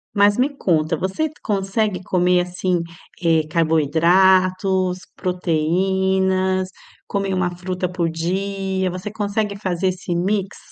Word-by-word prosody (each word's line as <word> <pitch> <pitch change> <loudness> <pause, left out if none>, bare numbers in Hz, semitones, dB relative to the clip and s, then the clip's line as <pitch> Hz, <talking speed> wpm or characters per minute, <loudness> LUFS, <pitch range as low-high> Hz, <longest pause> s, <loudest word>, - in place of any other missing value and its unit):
Mas 205 +1 +4
me 260 +3 +2
conta, 160 - +1
você 190 - -1 0.2
consegue 200 -1 -1
comer, 180 0 +2
assim, 180 0 -1 0.4
eh, 160 -2 +3
carboidratos, 185 +4 +3 0.2
proteínas, 185 +2 0 0.4
comer 195 -1 -1
uma 175 -1 -1
fruta 180 0 -3
por 175 -2 -1
dia? 190 +2 -2
Você 185 +3 -6
consegue 205 -1 -2
fazer 185 -2 -1
esse 180 -1 -2
mix? 195 +2 -1
185 Hz, 110 wpm, -21 LUFS, 175-195 Hz, 0.4 s, Mas